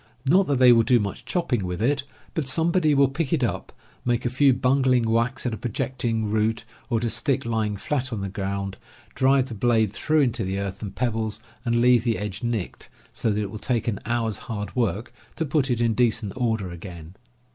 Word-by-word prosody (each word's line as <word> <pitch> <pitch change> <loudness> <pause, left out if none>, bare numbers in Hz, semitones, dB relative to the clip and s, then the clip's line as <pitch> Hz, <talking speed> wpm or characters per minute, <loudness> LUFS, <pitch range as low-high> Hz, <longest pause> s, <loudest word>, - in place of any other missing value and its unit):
Not 180 +8 +4
that 140 - +1
they 125 -1 +7
will 115 - +5
do 120 +1 +4
much 100 +2 -4
chopping 120 - 0
with 90 -1 -3
it; 140 +5 +1 0.3
but 155 -5 -2
somebody 160 +2 +2
will 140 0 +5
pick 140 +2 -3
it 155 -6 +1
up, 105 -7 -2 0.3
make 120 0 0
a 120 - 0
few 135 +2 +4
bungling 130 -1 +2
whacks 115 +4 0
at 120 - 0
a - - -4
projecting 120 -1 -2
root, 110 +1 0 0.2
or 120 - +1
at 110 - -2
a 115 - +1
stick 135 -6 0
lying 110 -3 -1
flat 130 +4 -2
on 110 -4 -3
the 100 - -2
ground, 100 0 -4 0.4
drive 135 0 +3
the 125 - -7
blade 110 -1 +2
through 155 +4 +2
into 120 -4 0
the 95 +1 -2
earth 100 0 -4
and 100 -3 -6
pebbles, 110 -3 -1 0.2
and 120 -1 +1
leave 120 -1 +5
the 115 -2 +1
edge 105 -3 -5
nicked 115 -6 -3 0.2
so - - -1
that 105 0 0
it 100 - -5
will 110 - -7
take 120 -1 -1
an 105 -4 -1
hour's 115 -3 -1
hard 105 -2 -4
work 115 0 -1 0.2
to 160 - -1
put 145 -2 +1
it 120 -2 +1
in 115 -1 +2
decent 110 -3 +1
order 110 -7 -1
again. 85 -1 -9
120 Hz, 215 wpm, -24 LUFS, 105-130 Hz, 0.4 s, they